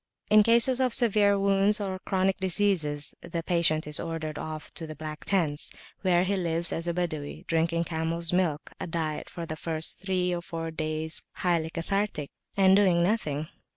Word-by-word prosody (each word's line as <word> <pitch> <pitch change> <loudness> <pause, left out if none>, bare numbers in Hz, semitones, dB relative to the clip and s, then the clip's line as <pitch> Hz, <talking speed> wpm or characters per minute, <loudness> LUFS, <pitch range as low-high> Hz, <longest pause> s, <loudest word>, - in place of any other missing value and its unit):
In 215 0 +8
cases 235 +4 +4
of 255 -3 +3
severe 205 -4 +4
wounds 200 +1 +3
or 190 -2 -3
chronic 190 0 0
diseases, 180 -6 +1
the 165 -1 -5
patient 160 -2 +3
is 150 0 +1
ordered 160 -2 -4
off 155 -1 -6
to 165 - -7
the 155 - -7
Black 155 0 -7
Tents, 160 -7 +1 0.3
where 180 -2 +3
he 200 +2 0
lives 170 -2 +2
as 165 +1 -3
a 170 - 0
Badawi, 155 -5 -4
drinking 165 +1 +1
camels' 165 +1 -2
milk 170 -5 0
(a - - -4
diet 160 -2 -3
for 170 -2 -6
the 155 - -5
first 160 0 -4
three 180 -1 0
or 175 - -3
four 165 -1 -5
days 155 0 -2
highly 170 -3 0
cathartic), 170 -2 -2 0.3
and 190 -1 +6
doing 185 -4 +4
nothing. 155 -7 -1
170 Hz, 175 wpm, -27 LUFS, 160-195 Hz, 0.3 s, In